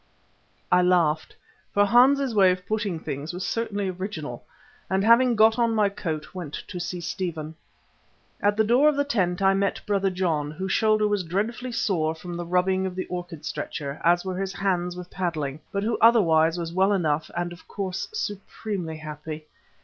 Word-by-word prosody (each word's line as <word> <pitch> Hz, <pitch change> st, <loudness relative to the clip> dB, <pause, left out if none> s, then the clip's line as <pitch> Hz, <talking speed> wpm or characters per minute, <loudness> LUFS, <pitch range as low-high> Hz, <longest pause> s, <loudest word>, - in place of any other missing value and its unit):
I 180 Hz, -, +6 dB
laughed, 170 Hz, -4 st, +2 dB, 0.4 s
for 205 Hz, 0 st, +5 dB
Hans's 255 Hz, +4 st, +4 dB
way 195 Hz, -3 st, +6 dB
of 180 Hz, 0 st, -1 dB
putting 210 Hz, -6 st, -2 dB
things 150 Hz, +2 st, -5 dB
was 180 Hz, +1 st, -4 dB
certainly 205 Hz, 0 st, -2 dB
original, 175 Hz, -, -5 dB, 0.5 s
and 190 Hz, +1 st, +1 dB
having 235 Hz, +2 st, +5 dB
got 220 Hz, +2 st, +5 dB
on 230 Hz, -1 st, +2 dB
my 210 Hz, -2 st, +3 dB
coat, 160 Hz, -6 st, -5 dB
went 175 Hz, -6 st, -6 dB
to 180 Hz, -, -5 dB
see 175 Hz, +1 st, -4 dB
Stephen. 165 Hz, -2 st, -4 dB, 0.9 s
At 205 Hz, +1 st, +2 dB
the 220 Hz, -, +4 dB
door 250 Hz, +7 st, +5 dB
of 300 Hz, -, 0 dB
the 285 Hz, -, +2 dB
tent 195 Hz, -9 st, 0 dB
I 195 Hz, 0 st, +5 dB
met 195 Hz, 0 st, 0 dB
Brother 195 Hz, -2 st, +1 dB
John, 170 Hz, -6 st, -1 dB
whose 190 Hz, +5 st, -4 dB
shoulder 215 Hz, 0 st, +3 dB
was 205 Hz, -2 st, 0 dB
dreadfully 215 Hz, +9 st, -2 dB
sore 165 Hz, -9 st, 0 dB
from 175 Hz, +2 st, -7 dB
the 175 Hz, 0 st, -5 dB
rubbing 185 Hz, +2 st, +1 dB
of 180 Hz, -, -6 dB
the 185 Hz, -, -3 dB
orchid 175 Hz, -3 st, -6 dB
stretcher, 140 Hz, -2 st, -5 dB
as 175 Hz, +2 st, +3 dB
were 185 Hz, -1 st, -3 dB
his 195 Hz, 0 st, -3 dB
hands 180 Hz, -2 st, -1 dB
with 180 Hz, 0 st, -9 dB
paddling, 155 Hz, -6 st, -3 dB
but 200 Hz, -1 st, -1 dB
who 225 Hz, -, 0 dB
otherwise 165 Hz, -8 st, +5 dB
was 170 Hz, -1 st, -4 dB
well 190 Hz, +3 st, +3 dB
enough 155 Hz, -5 st, 0 dB
and 175 Hz, 0 st, -2 dB
of 175 Hz, -, -16 dB
course 190 Hz, -2 st, -4 dB
supremely 200 Hz, -, -4 dB
happy. 155 Hz, 0 st, -7 dB
185 Hz, 180 wpm, -25 LUFS, 170-205 Hz, 0.9 s, I